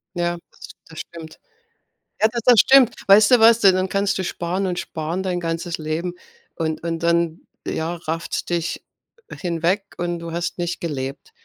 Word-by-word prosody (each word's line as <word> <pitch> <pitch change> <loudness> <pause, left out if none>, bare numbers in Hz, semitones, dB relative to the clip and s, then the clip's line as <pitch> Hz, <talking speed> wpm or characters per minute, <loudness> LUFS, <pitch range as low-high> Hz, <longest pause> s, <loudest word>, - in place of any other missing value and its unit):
Ja, 175 0 -1
das - - -13 0.2
das 160 - -10
stimmt. 165 -2 -10 0.8
Ja, 220 - +6
da 240 - -2
das 245 -4 +7
stimmt. 265 -3 +6
Weißt 210 +4 +7
du 250 - +7
was? 225 +1 +6
Ja 195 -2 +7
dann 185 0 0
kannst 200 +1 0
du 190 - -2
sparen 180 +3 -2
und 180 -1 -2
sparen 160 +4 -4
dein 180 -2 -1
ganzes 165 +1 -3
Leben. 160 +3 -3 0.4
Und 160 -2 -2
und 165 -1 -2
dann 170 -1 +1 0.3
ja, 165 +2 -2
rafft's 165 0 -4
dich 170 -1 -3 0.4
hinweg 175 +3 -1
und 175 -1 -2
du 165 0 -7
hast 170 +2 -3
nicht 175 0 -2
gelebt. 140 - -5
175 Hz, 175 wpm, -21 LUFS, 165-190 Hz, 0.8 s, das